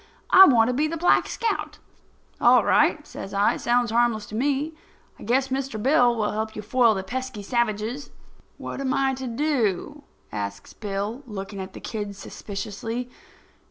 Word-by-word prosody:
I 385 Hz, -, +10 dB
want 230 Hz, -4 st, +5 dB
to 250 Hz, -, 0 dB
be 295 Hz, +5 st, +1 dB
the 330 Hz, +2 st, -4 dB
Black 350 Hz, +2 st, +3 dB
Scout." 460 Hz, -, -3 dB, 0.6 s
"All -, -, +6 dB
right," -, -, +3 dB
says 195 Hz, -, -8 dB
I. 200 Hz, +1 st, +3 dB
"It -, -, -7 dB
sounds 240 Hz, -1 st, +1 dB
harmless 230 Hz, -2 st, +2 dB
to 210 Hz, -, -9 dB
me. 285 Hz, +5 st, 0 dB, 0.5 s
I -, -, -10 dB
guess 260 Hz, +4 st, +1 dB
Mr. 265 Hz, -4 st, -3 dB
Bill 245 Hz, 0 st, +4 dB
will 215 Hz, -2 st, -1 dB
help 220 Hz, +1 st, -3 dB
you 215 Hz, -, -6 dB
foil 230 Hz, +1 st, +3 dB
the 190 Hz, -, -3 dB
pesky 255 Hz, 0 st, -5 dB
savages." 235 Hz, +3 st, -2 dB, 0.5 s
"What -, -, -6 dB
am 265 Hz, 0 st, 0 dB
I 270 Hz, -1 st, +1 dB
to 260 Hz, 0 st, -5 dB
do?" 270 Hz, -, -1 dB, 0.3 s
asks 100 Hz, -1 st, -6 dB
Bill, 205 Hz, +4 st, -4 dB
looking 195 Hz, -2 st, -6 dB
at 190 Hz, 0 st, -7 dB
the -, -, -9 dB
kid 205 Hz, -2 st, -5 dB
suspiciously. 220 Hz, +5 st, -6 dB
235 Hz, 170 wpm, -24 LUFS, 210-265 Hz, 0.6 s, I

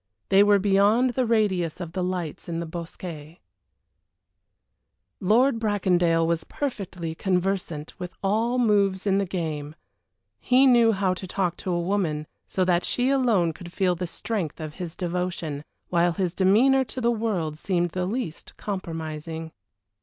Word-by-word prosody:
They 195 Hz, +1 st, +6 dB
were 205 Hz, 0 st, +6 dB
beyond 205 Hz, +5 st, +3 dB
the 250 Hz, 0 st, 0 dB
radius 190 Hz, -8 st, +1 dB
of 170 Hz, -3 st, -5 dB
the 185 Hz, +1 st, -2 dB
lights 180 Hz, -3 st, -4 dB
in 165 Hz, -1 st, -2 dB
the 170 Hz, -, -3 dB
bosquet. 165 Hz, -1 st, -8 dB, 1.8 s
Lord 230 Hz, +5 st, +3 dB
Bracondale 180 Hz, -6 st, +2 dB
was 165 Hz, -1 st, 0 dB
perfectly 190 Hz, -, -4 dB
conversant 180 Hz, -3 st, -1 dB
with 180 Hz, -1 st, -5 dB
all 225 Hz, +5 st, +1 dB
moves 200 Hz, -5 st, +2 dB
in 195 Hz, -1 st, +3 dB
the 200 Hz, -, -1 dB
game; 155 Hz, -5 st, -4 dB, 0.7 s
he 255 Hz, +2 st, +5 dB
knew 240 Hz, -3 st, +6 dB
how 195 Hz, -3 st, +1 dB
to 185 Hz, +1 st, -7 dB
talk 180 Hz, -2 st, -1 dB
to 185 Hz, -, -4 dB
a 175 Hz, -, +1 dB
woman 170 Hz, -5 st, -1 dB, 0.2 s
so 185 Hz, -, 0 dB
that 180 Hz, -1 st, +2 dB
she 250 Hz, +2 st, +1 dB
alone 225 Hz, -11 st, +2 dB
could 175 Hz, +2 st, -10 dB
feel 185 Hz, -1 st, +1 dB
the 175 Hz, +1 st, -4 dB
strength 180 Hz, -4 st, -4 dB
of 155 Hz, -1 st, -6 dB
his 170 Hz, -2 st, -5 dB
devotion, 175 Hz, -5 st, -3 dB, 0.3 s
while 175 Hz, 0 st, +2 dB
his 180 Hz, -2 st, -1 dB
demeanor 230 Hz, +9 st, +4 dB
to 255 Hz, +2 st, -7 dB
the 235 Hz, -1 st, +2 dB
world 190 Hz, -10 st, -2 dB
seemed 175 Hz, -2 st, 0 dB
the 180 Hz, +1 st, -2 dB
least 205 Hz, -6 st, -5 dB
compromising. 160 Hz, -4 st, -5 dB
185 Hz, 155 wpm, -25 LUFS, 170-210 Hz, 1.8 s, They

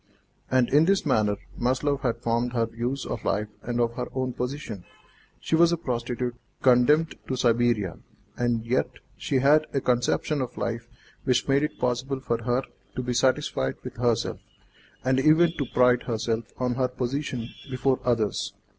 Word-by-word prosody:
And 130 Hz, -2 st, +3 dB
in 150 Hz, +3 st, +5 dB
this 195 Hz, 0 st, +2 dB
manner 110 Hz, -7 st, +2 dB, 0.2 s
Maslova 135 Hz, +3 st, +1 dB
had 115 Hz, 0 st, -2 dB
formed 120 Hz, +1 st, 0 dB
her 115 Hz, -2 st, +2 dB
views 120 Hz, +4 st, -3 dB
of 115 Hz, -, -4 dB
life 105 Hz, +1 st, 0 dB
and 120 Hz, 0 st, -3 dB
of 115 Hz, -1 st, +1 dB
her 125 Hz, +1 st, -4 dB
own 130 Hz, -1 st, -1 dB
position. 125 Hz, -7 st, -4 dB, 0.6 s
She -, -, 0 dB
was 170 Hz, +1 st, +5 dB
a 170 Hz, -, +1 dB
prostitute 125 Hz, -4 st, -2 dB, 0.3 s
condemned 135 Hz, +6 st, +4 dB
to 130 Hz, -, -1 dB
Siberia, 120 Hz, -6 st, +1 dB, 0.4 s
and 120 Hz, -2 st, 0 dB
yet 125 Hz, +3 st, +1 dB, 0.3 s
she -, -, -3 dB
had 145 Hz, +4 st, +4 dB
a -, -, +3 dB
conception 125 Hz, +4 st, +1 dB
of 125 Hz, -1 st, -5 dB
life 115 Hz, -1 st, -3 dB, 0.4 s
which 125 Hz, -2 st, +1 dB
made 140 Hz, 0 st, +3 dB
it 150 Hz, -, -2 dB
possible 125 Hz, +2 st, -1 dB
for 115 Hz, -3 st, -2 dB
her 125 Hz, +2 st, +1 dB, 0.3 s
to 125 Hz, -, -2 dB
be 125 Hz, 0 st, -1 dB
satisfied 120 Hz, -, +1 dB
with -, -, -8 dB
herself, 120 Hz, -1 st, 0 dB, 0.7 s
and 130 Hz, 0 st, +3 dB
even 160 Hz, +4 st, +5 dB
to 140 Hz, -, -1 dB
pride 125 Hz, 0 st, +4 dB
herself 115 Hz, 0 st, -2 dB
on 125 Hz, -1 st, 0 dB
her 130 Hz, +1 st, +1 dB
position 125 Hz, -1 st, -3 dB, 0.2 s
before 130 Hz, 0 st, +1 dB
others. 115 Hz, -4 st, 0 dB
125 Hz, 165 wpm, -26 LUFS, 120-135 Hz, 0.7 s, in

